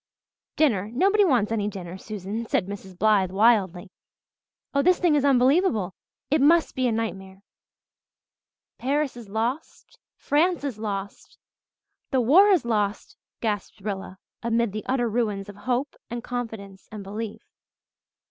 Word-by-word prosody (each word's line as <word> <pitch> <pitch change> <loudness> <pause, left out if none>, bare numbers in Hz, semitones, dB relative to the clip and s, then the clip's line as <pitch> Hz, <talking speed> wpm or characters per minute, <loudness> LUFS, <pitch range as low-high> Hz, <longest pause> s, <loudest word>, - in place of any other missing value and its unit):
"Dinner! 215 -10 +2
Nobody 395 - +3
wants 245 - +2
any 210 -2 0
dinner, 185 -3 -6
Susan," 210 +3 -6
said 180 - +1
Mrs. 190 -2 -9
Blythe 205 -2 +3
wildly. 195 -3 +2 0.8
"Oh, 280 - +3
this 360 +4 +4
thing 345 -4 +2
is 290 -2 +2
unbelievable 255 - +3 0.4
it 305 -1 +3
must 325 +4 +4
be 255 -1 0
a - - +1
nightmare." 195 -4 -4 1.4
"Paris 280 +1 0
is 235 -4 -11
lost 235 +8 -4 0.2
France 335 +2 +1
is 260 -7 -4
lost 200 -2 -5 0.7
the 265 - +1
war 305 - +6
is 365 -10 +3
lost," 210 -3 -1 0.3
gasped 210 -2 -3
Rilla, 195 -2 -5 0.2
amid 235 -1 +1
the 215 +1 -5
utter 250 -2 +1
ruins 210 -3 -1
of 205 - -9
hope 255 +3 0
and 240 0 -5
confidence 220 -6 -6
and 210 -2 -7
belief. 210 +2 -6
225 Hz, 140 wpm, -25 LUFS, 200-265 Hz, 1.4 s, war